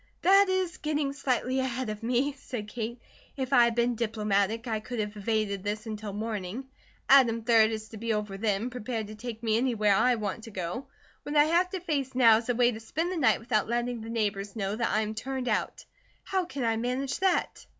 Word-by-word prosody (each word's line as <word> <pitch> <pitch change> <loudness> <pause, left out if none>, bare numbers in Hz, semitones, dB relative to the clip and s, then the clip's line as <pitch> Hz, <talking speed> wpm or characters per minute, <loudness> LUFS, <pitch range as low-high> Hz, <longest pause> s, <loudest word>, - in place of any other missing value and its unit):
"That 390 +2 +6
is 370 -1 0
getting 295 -2 -1
slightly 260 -1 0
ahead 260 -2 -2
of 210 - -7
me," 250 +5 +1
said 250 -6 -7
Kate. 235 +2 -5 0.4
"If 265 0 -2
I 245 -2 +7
had 235 -1 0
been 240 +1 +2
diplomatic 215 0 0
I 220 -2 -1
could 245 +3 -6
have 210 0 -3
evaded 205 -2 -1
this 210 +2 -3
until 215 -1 -5
morning. 215 +2 -4 0.4
Adam, 235 -4 +5
3d, 225 -2 +5
is 220 -1 -5
to 220 - -9
be 230 +2 -2
over 210 -2 -2
then, 210 +3 -1
prepared 240 -2 -4
to 215 - -8
take 225 +1 -7
me 220 -1 +2
anywhere 225 -5 +2
I 245 +4 +4
want 215 0 -4
to - - -9
go. 190 +5 -5 0.3
What 295 - -5
I 295 - +7
have 340 +4 +2
to 375 - -4
face 280 -7 -2
now 230 -4 +7
is 230 +2 -5
a 245 - +2
way 245 0 +4
to 220 - -7
spend 325 +10 -2
the - - -2
night 225 -9 +3
without 225 -2 0
letting 240 0 -1
the 225 - -7
neighbours 205 -3 -2
know 200 -2 -2
that 235 +1 0
I 215 - +2
am 215 0 -3
turned 255 +3 -4
out. 215 - -1 0.4
How 380 -2 -1
can 285 -7 -5
I 225 -1 +1
manage 255 +4 -2
that?" 375 -1 0
230 Hz, 220 wpm, -28 LUFS, 215-260 Hz, 0.4 s, I